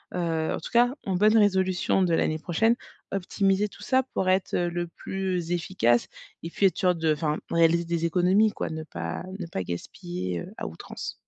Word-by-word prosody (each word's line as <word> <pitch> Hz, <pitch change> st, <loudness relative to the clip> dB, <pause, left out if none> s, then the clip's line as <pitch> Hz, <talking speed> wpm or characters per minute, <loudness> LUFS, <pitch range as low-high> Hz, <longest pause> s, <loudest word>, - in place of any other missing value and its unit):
heu, 165 Hz, -3 st, 0 dB
en -, -, -3 dB
tout -, -, -8 dB
cas, 245 Hz, +1 st, +4 dB
en 190 Hz, -, 0 dB
bonne 215 Hz, +3 st, +5 dB
résolution 190 Hz, -3 st, +2 dB
de 175 Hz, -2 st, +2 dB
l'année 155 Hz, -1 st, +1 dB
prochaine, 225 Hz, +9 st, +2 dB, 0.3 s
optimiser 195 Hz, +1 st, +1 dB
tout -, -, -14 dB
ça 260 Hz, 0 st, +2 dB
pour 185 Hz, -, 0 dB
être 185 Hz, 0 st, +1 dB
le 175 Hz, 0 st, -1 dB
plus 180 Hz, -1 st, -3 dB
efficace 165 Hz, -9 st, +1 dB, 0.3 s
et 165 Hz, -, -5 dB
puis 195 Hz, +3 st, +3 dB
être 180 Hz, -, -3 dB
sûr 180 Hz, -1 st, +2 dB
de 160 Hz, -1 st, +1 dB
enfin 150 Hz, 0 st, -1 dB
réaliser 170 Hz, 0 st, +4 dB
des 170 Hz, 0 st, -1 dB
économies 185 Hz, +5 st, +3 dB
quoi, -, -, -3 dB
ne 160 Hz, -1 st, -5 dB
pas 85 Hz, -, -5 dB, 0.2 s
ne 180 Hz, -, -3 dB
pas 95 Hz, -, -3 dB
gaspiller, 90 Hz, 0 st, -5 dB
heu, -, -, -11 dB
à -, -, -4 dB
outrance. 80 Hz, -, -7 dB
175 Hz, 190 wpm, -26 LUFS, 160-190 Hz, 0.3 s, bonne